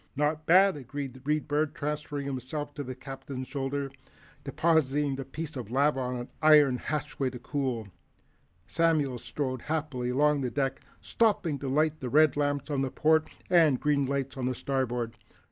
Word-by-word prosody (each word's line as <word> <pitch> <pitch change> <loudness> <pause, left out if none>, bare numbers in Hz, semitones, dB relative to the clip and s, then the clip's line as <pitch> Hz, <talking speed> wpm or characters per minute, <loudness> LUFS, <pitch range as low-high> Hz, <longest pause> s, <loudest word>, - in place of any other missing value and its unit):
"Not 150 +2 0
bad," 190 +2 +6
agreed 140 0 -6
the 130 - -13
Read 150 +2 0
Bird, 150 0 0
transferring 150 -2 -3
himself 140 +2 -4
to 145 - -5
the 130 -1 -6
Captain's 130 0 -7
shoulder. 140 0 -3 0.5
Depositing 150 -4 +1
the 135 - -4
piece 155 +3 -6
of 120 -5 -6
lava 140 +3 +2
on 125 -1 -2
an 120 0 -6
iron 150 -4 +6
hatchway 140 -2 -2
to 125 - -8
cool, 125 -4 -3 0.8
Samuel 150 - +1
strode 130 -1 -3
happily 150 -6 -2
along 145 +3 +3
the 125 - -1
deck, 135 +1 -1 0.2
stopping 195 -10 +1
to 135 - -4
light 155 +3 +1
the 125 - -4
red 155 +1 +5
lamps 145 0 -1
on 140 -2 0
the 135 - 0
port 160 +3 +2 0.2
and 165 -6 +5
the - - -21
green 145 -2 +2
lights 135 -1 -2
on 125 -1 -1
the 130 - -1
starboard. 120 -4 -2
140 Hz, 175 wpm, -29 LUFS, 130-150 Hz, 0.8 s, bad